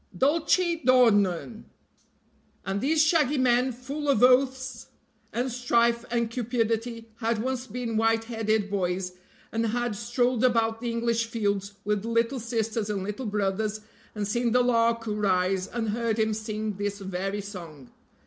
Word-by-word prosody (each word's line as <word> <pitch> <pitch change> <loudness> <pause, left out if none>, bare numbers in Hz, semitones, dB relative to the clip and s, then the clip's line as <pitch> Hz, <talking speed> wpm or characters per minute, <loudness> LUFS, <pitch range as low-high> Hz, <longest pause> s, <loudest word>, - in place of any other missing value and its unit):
Dulce 335 - +2
dornurn! 220 -5 +3 1.0
And 195 +1 -2
these 305 +3 +3
shaggy 300 -3 +3
men, 250 0 +3
full 275 +5 -5
of 255 -4 +3
oaths 260 -1 +3 0.4
and 250 +2 -1
strife 235 -1 +2
and 235 -1 0
cupidity, 230 -1 -2
had 230 -1 0
once 255 +2 -3
been 230 0 -3
white 225 0 +2
headed 220 -2 0
boys, 180 -1 -1 0.4
and 225 0 0
had 240 0 -1
strolled 240 +2 0
about 225 -2 +2
the 240 - -2
English 230 0 0
fields 205 -3 -1
with 210 -1 0
little 230 +3 0
sisters 225 -2 -2
and 200 -2 -2
little 210 +5 -4
brothers, 210 +1 -1 0.3
and 205 -1 -2
seen 235 +2 0
the 250 0 +4
lark 230 -1 +2
rise, 190 -3 +1
and 230 -2 -3
heard 230 0 -1
him 220 -1 +1
sing 215 -1 -4
this 205 0 -2
very 195 +1 -3
song. 170 - -10
230 Hz, 145 wpm, -27 LUFS, 210-245 Hz, 1.0 s, the